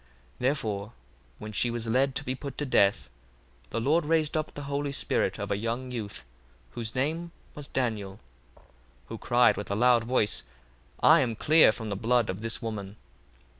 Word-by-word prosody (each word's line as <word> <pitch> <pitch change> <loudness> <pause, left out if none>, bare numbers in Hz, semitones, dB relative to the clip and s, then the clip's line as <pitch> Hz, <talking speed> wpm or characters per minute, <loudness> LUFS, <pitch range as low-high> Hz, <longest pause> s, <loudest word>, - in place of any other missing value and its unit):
1:45 - - -31 0.3
Therefore 115 -5 -1 0.4
when 105 - -8
she 120 +3 +1
was 115 -1 -3
led 130 +4 +1
to 140 - -3
be 130 - -2
put 135 0 -7
to 145 - -1
death, 100 -6 +2 0.6
the - - -2
Lord 150 +8 +2
raised 155 0 +1
up 155 -1 -2
the 145 - -6
holy 140 0 -2
spirit - - 0
of - - -5
a 100 - +1
young 120 +4 -3
youth 105 - -5 0.5
whose 115 -2 -4
name 160 +6 -1 0.2
was 145 -1 -8
Daniel: 105 -7 -3 0.4
1:46 - - -23 0.5
Who - - -5
cried 120 0 +3
with 105 - -5
a 100 - -1
loud 120 +1 +4
voice, 115 -4 +1 0.6
I 160 +2 +7
am 120 -5 0
clear 155 +3 +5
from 110 0 -6
the - - -1
blood 115 +1 +1
of 95 +3 -8
this 115 +1 -3
woman. 105 -3 -5
120 Hz, 185 wpm, -28 LUFS, 110-140 Hz, 0.6 s, I